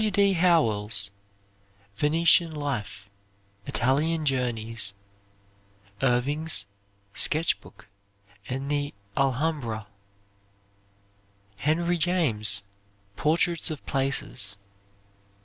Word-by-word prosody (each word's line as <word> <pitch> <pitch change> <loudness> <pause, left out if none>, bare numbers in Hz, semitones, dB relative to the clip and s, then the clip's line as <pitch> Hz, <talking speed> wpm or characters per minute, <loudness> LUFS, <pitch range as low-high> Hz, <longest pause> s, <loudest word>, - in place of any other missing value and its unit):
W. 215 - +2
D. 200 -1 +3
Howell's 110 - +2 0.8
"Venetian 165 - +4
Life"; 105 -9 -5 0.6
"Italian 150 +6 +1
Journeys." 115 -6 0 1.1
Irving's 135 0 +2 0.5
"Sketch 160 +2 +2
Book," 110 - -17 0.6
and 135 +3 -3
the 145 -4 -2 0.2
"Alhambra." 135 -5 -1 1.7
Henry 170 - 0
James, 120 - +1 0.5
"Portraits 165 - +2
of 155 -3 -6
Places." 130 -6 0
140 Hz, 70 wpm, -26 LUFS, 110-165 Hz, 1.7 s, Venetian